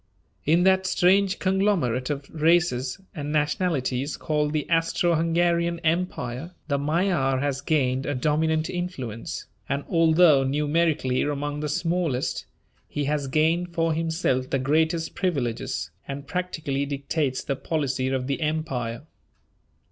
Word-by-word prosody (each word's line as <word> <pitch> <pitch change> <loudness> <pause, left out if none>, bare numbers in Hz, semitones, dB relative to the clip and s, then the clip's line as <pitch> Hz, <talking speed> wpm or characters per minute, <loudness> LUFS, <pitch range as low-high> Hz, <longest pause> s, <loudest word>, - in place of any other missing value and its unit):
In 170 +3 +4
that 190 0 +4
strange 190 +2 +3
conglomerate 185 - +1
of 140 -1 -3
races 160 -4 +2
and 145 -4 -4
nationalities 150 -3 0
called 150 -1 0
the 150 -2 -1
Austro 165 +1 +2
Hungarian 170 +1 +1
Empire, 165 -2 -2
the 140 -2 0
Magyar 150 -3 +1
has 140 -1 -1
gained 135 -3 +1
a 145 - -1
dominant 155 +3 +1
influence, 165 - -5 0.2
and 140 +1 -1
although 165 -3 +5
numerically 145 -1 +1
among 145 0 -2
the 150 0 -2
smallest, 165 -4 -1 0.4
he 145 - -3
has 145 0 -1
gained 165 +5 +1
for 165 -1 +2
himself 160 -5 0
the - - +1
greatest 160 +4 +1
privileges, 140 - -2 0.2
and 140 +1 -5
practically 155 -5 -2
dictates 140 -1 -2
the 140 - -1
policy 135 -3 -1
of 130 -1 -1
the 140 +4 -2
Empire. 145 -7 -2
150 Hz, 125 wpm, -25 LUFS, 135-170 Hz, 0.4 s, although